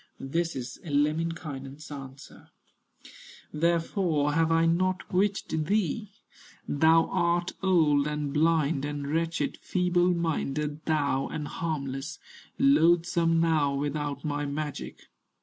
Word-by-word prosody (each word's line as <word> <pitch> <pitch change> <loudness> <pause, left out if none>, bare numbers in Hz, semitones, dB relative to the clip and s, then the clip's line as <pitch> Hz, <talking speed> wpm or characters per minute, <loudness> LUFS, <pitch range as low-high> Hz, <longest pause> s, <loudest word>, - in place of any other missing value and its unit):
This 165 +5 -2
is 130 -1 -6
Lemminkainen's 150 -2 -2
answer: 135 0 -10 1.0
"Therefore 165 -1 +1
have 165 +1 +2
I 165 0 +4
not 185 +3 +1
bewitched 185 -5 0
thee: 205 +2 0 0.6
Thou 160 +3 +4
art 175 +1 +1
old, 155 -7 +3
and 150 -2 -3
blind, 155 -2 +2
and 145 -1 -4
wretched 165 +2 -1
Feeble 180 -1 +1
minded 150 -2 -2
thou, 145 -4 +1
and 150 -2 -5
harmless, 145 -2 -4 0.4
Loathsome 170 - +3
now 155 -4 +2
without 145 0 -3
my 145 -1 -1
magic. 145 0 -5
155 Hz, 105 wpm, -28 LUFS, 145-170 Hz, 1.0 s, I